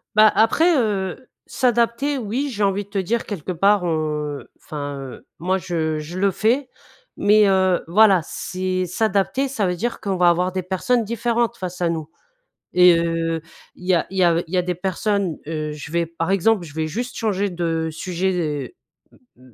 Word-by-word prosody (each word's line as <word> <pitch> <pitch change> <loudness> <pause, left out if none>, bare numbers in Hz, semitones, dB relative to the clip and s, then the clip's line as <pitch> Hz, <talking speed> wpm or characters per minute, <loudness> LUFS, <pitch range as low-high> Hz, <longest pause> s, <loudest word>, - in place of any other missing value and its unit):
Bah, 215 0 +7
après, 320 - +4
heu, 210 0 -1 0.2
s'adapter 245 +3 +1
oui, 250 +5 -2
j'ai 210 -3 -2
envie 200 +1 +1
de 200 - -24
te 200 - -4
dire 225 +5 -1
quelque 185 -4 -5
part 195 +3 +3
on, 170 -2 0 0.4
heu, - - -16
enfin, 145 -2 -6
heu, 135 -2 -9
moi 185 +4 0
je 160 -4 -2
je 165 +4 -7
le 195 0 +3
fais 250 +7 +1 0.5
mais 210 +1 +5
heu, 190 -2 +2
voilà, 195 0 +5
c'est 185 +2 -3
s'adapter 215 +7 0
ça 225 -6 -1
veut 180 - -1
dire 235 +7 -3
qu'on 195 -2 -2
va 175 -1 +5
avoir 180 +2 +1
des 185 0 -3
personnes 195 +7 0
différentes 235 +1 -1
face 180 -1 -6
à 170 - +2
nous, 160 -2 -3 0.6
et 180 -2 +6
heu, 165 -1 -1 0.3
il 180 - -12
y 185 - +4
a 170 - +1
il 190 - -5
y 180 - +5
av 170 0 +3
il 170 - -8
y - - +3
a 180 - +3
des 180 0 -2
personnes, 190 0 -1
heu 155 -1 -3
je 150 0 -8
vais, 170 0 +1
par 165 +2 -3
exemple, 195 0 +2
je 145 - -13
vais 160 0 -1
juste 240 +9 -4
changer 205 -3 0
de 165 -2 -1
sujet, 180 +3 -2
et 155 - -3 0.6
m 125 -1 -19
185 Hz, 195 wpm, -21 LUFS, 170-215 Hz, 0.6 s, Bah